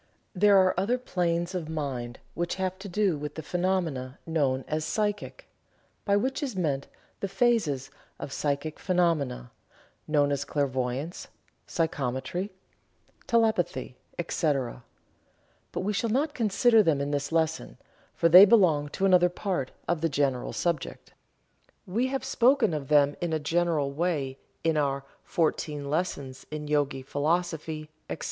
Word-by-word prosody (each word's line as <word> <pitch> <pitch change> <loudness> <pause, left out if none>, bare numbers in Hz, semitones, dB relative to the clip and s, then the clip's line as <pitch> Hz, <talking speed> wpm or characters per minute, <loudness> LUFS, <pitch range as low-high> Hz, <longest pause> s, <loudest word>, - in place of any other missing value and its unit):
There 200 +1 +5
are 185 -1 +5
other 225 +6 +1
planes 175 -6 -1
of 170 -4 -4
mind 130 -6 -4 0.2
which 175 0 -2
have 190 -1 -2
to 200 +1 -7
do 185 -4 +1
with 150 0 -6
the 160 - -6
phenomena 170 -8 -1
known 140 -5 0
as 155 0 -1
"psychic," 210 - -2 0.6
by 200 - +3
which 265 +8 -1
is 265 -7 -3
meant 145 -7 -1 0.3
the 195 - -2
phases 195 - +1 0.3
of 135 - -7
psychic 145 +2 -2
phenomena 165 - 0 0.6
known 145 -2 +2
as 140 0 0
clairvoyance, 140 +2 -2 0.4
psychometry, 160 +3 -2 0.8
telepathy, 220 - +1 0.2
etc., 140 -7 -1 0.9
but - - -3
we 205 +3 -1
shall 225 +3 0
not 285 +6 +1
consider 225 0 +4
them 160 -8 +2
in 140 +1 -2
this 145 0 -2
lesson, 160 - -1 0.4
for 165 - +3
they 180 +4 +10
belong 180 -9 +5
to 195 +6 -1
another 180 -2 +5
part 175 -7 -2 0.2
of 175 -3 0
the 165 - +1
general 140 -3 0
subject. 170 -4 -3 0.7
We 230 +8 0
have 265 0 -3
spoken 255 - +3
of 145 -3 -3
them 145 -1 +4
in 170 -2 -1
a 155 - +1
general 160 -2 +1
way 140 -4 -1 0.2
in 160 -1 +2
our 140 -2 0 0.2
"Fourteen 150 -4 -1
Lessons 140 -5 -3
in 150 -1 -5
Yogi 145 -2 0
Philosophy, 155 +1 -2 0.2
etc." - - -4
160 Hz, 140 wpm, -28 LUFS, 145-190 Hz, 0.9 s, they